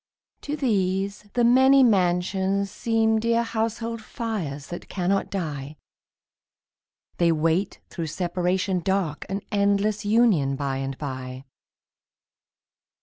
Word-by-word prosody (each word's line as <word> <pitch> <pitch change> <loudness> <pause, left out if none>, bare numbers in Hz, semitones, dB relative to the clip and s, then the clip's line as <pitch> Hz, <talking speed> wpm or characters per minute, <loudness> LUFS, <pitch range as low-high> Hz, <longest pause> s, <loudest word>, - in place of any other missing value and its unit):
To 295 - -3
these 200 -4 -1
the 240 - +2
many 265 +3 +6
mansions 190 -1 +1
seem 225 -1 +1
Dear 230 +1 +2
household 230 0 -3
fires 190 -12 -4
that 175 - -8
cannot 195 +1 0
die; 150 -6 -4 1.4
They 170 -1 +3
wait 165 +4 0
through 165 -2 -4
separation 180 +3 -1
dark 175 -4 -1
An 195 +1 -2
endless 205 +1 +1
union 205 - +3
by 135 -1 -2
and 135 0 -4
by. 130 -2 -6
195 Hz, 105 wpm, -25 LUFS, 165-220 Hz, 1.4 s, many